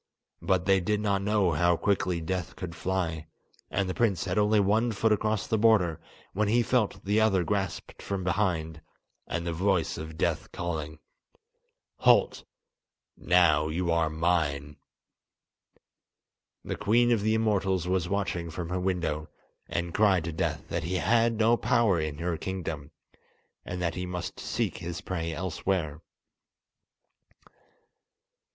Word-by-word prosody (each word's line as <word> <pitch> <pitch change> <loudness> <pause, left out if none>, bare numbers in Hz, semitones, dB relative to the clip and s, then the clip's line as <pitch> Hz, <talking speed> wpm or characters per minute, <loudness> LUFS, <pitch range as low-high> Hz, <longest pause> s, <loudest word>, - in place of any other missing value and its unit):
But 95 -2 +1
they 95 0 +4
did 105 +4 0
not 100 -2 0
know 100 -3 +2
how 85 +3 +2
quickly 90 -3 0
Death 90 +1 -3
could 90 -3 -6
fly, 85 -2 -2 0.4
and 100 -1 -1
the 90 - -2
prince 100 -5 +1
had 90 -2 -2
only 105 +1 +3
one 110 +4 +2
foot 110 +1 +1
across 110 0 +1
the 110 - 0
border, 100 -8 +3 0.3
when 105 +2 +1
he 120 +3 +3
felt 120 -6 0
the 105 +2 +2
other 95 -5 +3
grasped 95 -2 -3
from 100 -2 -3
behind, 85 -5 -1 0.5
and 85 0 -3
the 85 - -2
voice 95 0 0
of 80 0 -8
Death - - -1
calling: 80 -3 -4 1.0
"Halt! - - +3 0.7
now 85 -4 +3
you 85 +2 -1
are 85 -1 +2
mine." 80 -3 0 1.9
The - - -3
Queen 120 +3 +3
of 115 -3 +2
the 110 +1 +2
Immortals 100 -5 +1
was 90 -1 0
watching 95 -4 -2
from 85 +1 -5
her 90 +1 -1
window, 85 -5 -2 0.4
and 85 0 -3
cried 100 -5 +3
to 85 - -3
Death 80 - -2
that - - -1
he 90 +4 -2
had 115 +5 +3
no 115 +2 +4
power 115 -9 +2
in 75 -2 -3
her 85 0 -2
kingdom, 80 -5 -5 0.7
and 90 - -5
that 85 -1 0
he 90 0 -4
must 90 -1 -5
seek - - -2
his 85 0 -5
prey 85 -4 -3
elsewhere. 85 -2 -2
90 Hz, 145 wpm, -28 LUFS, 85-100 Hz, 1.9 s, they